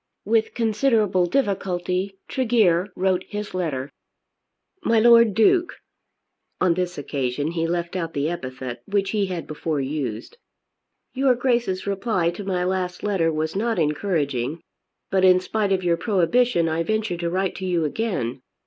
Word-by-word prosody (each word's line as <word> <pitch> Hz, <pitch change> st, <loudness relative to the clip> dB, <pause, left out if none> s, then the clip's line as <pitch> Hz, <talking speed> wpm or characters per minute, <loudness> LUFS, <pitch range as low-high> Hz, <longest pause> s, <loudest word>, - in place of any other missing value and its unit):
With 220 Hz, +1 st, +1 dB
considerable 215 Hz, -5 st, +2 dB
difficulty 190 Hz, -4 st, -1 dB
Tregear 220 Hz, -8 st, +2 dB
wrote 185 Hz, 0 st, +1 dB
his 210 Hz, 0 st, -5 dB
letter. 150 Hz, -7 st, -3 dB, 0.9 s
MY 230 Hz, -6 st, +3 dB
LORD 230 Hz, -2 st, +6 dB
DUKE, 350 Hz, -, +3 dB, 0.9 s
[On 185 Hz, -2 st, +3 dB
this 180 Hz, 0 st, -2 dB
occasion 140 Hz, +1 st, -2 dB
he 165 Hz, -1 st, -1 dB
left 170 Hz, +1 st, -2 dB
out 165 Hz, -3 st, -3 dB
the 140 Hz, +1 st, 0 dB
epithet 130 Hz, -7 st, -5 dB
which 195 Hz, -1 st, 0 dB
he 205 Hz, -3 st, 0 dB
had 180 Hz, -3 st, -4 dB
before 155 Hz, 0 st, -3 dB
used] 135 Hz, -, -4 dB, 0.8 s
Your 265 Hz, -1 st, +3 dB
Grace's 235 Hz, -7 st, 0 dB
reply 195 Hz, -3 st, 0 dB
to 175 Hz, +4 st, -7 dB
my 185 Hz, -2 st, -1 dB
last 180 Hz, -1 st, -2 dB
letter 190 Hz, -6 st, +1 dB
was 155 Hz, +1 st, -2 dB
not 225 Hz, +2 st, 0 dB
encouraging, 150 Hz, -4 st, -1 dB, 0.5 s
but 190 Hz, -1 st, +2 dB
in 185 Hz, -1 st, +6 dB
spite 205 Hz, +2 st, -1 dB
of 190 Hz, -1 st, +1 dB
your 170 Hz, -1 st, +2 dB
prohibition 195 Hz, +1 st, +2 dB
I 160 Hz, +1 st, 0 dB
venture 215 Hz, -1 st, -1 dB
to 170 Hz, 0 st, -2 dB
write 190 Hz, +2 st, -1 dB
to 190 Hz, -, -4 dB
you 170 Hz, -3 st, +1 dB
again. 150 Hz, -, -2 dB
185 Hz, 150 wpm, -23 LUFS, 165-210 Hz, 0.9 s, LORD